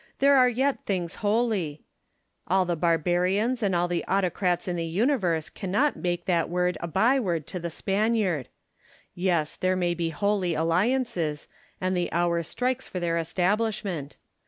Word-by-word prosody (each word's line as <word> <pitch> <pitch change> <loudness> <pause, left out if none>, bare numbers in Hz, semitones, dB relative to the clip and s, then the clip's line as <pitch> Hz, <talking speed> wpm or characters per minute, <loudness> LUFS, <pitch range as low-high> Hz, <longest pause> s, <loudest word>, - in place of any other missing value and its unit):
there 280 +1 +5
are 255 -2 +6
yet 265 +3 0
things 180 -4 -1
holy: 205 -8 0 0.6
all 185 +1 +3
the 175 -1 0
barbarians 180 +8 +1
and 195 -4 +1
all 175 +1 +2
the 175 -1 -1
autocrats 180 -2 0
in 180 - -1
the 170 - -2
universe 180 - +1
cannot 205 +12 0
make 175 -1 -2
that 170 -3 +1
word 180 0 0
a 170 - -3
byword 190 - +1
to 180 - -5
the 170 0 -4
Spaniard. 195 - 0 0.7
Yes, 175 -4 0
there 185 0 0
may 175 -1 +1
be 170 -1 -2
holy 190 0 0
alliances; 165 - 0 0.3
and 185 0 0
the 175 -1 -1
hour 170 0 +1
strikes 250 +9 -2
for 185 - -5
their 170 -1 0
establishment. 185 -2 -1
180 Hz, 155 wpm, -26 LUFS, 170-210 Hz, 0.7 s, are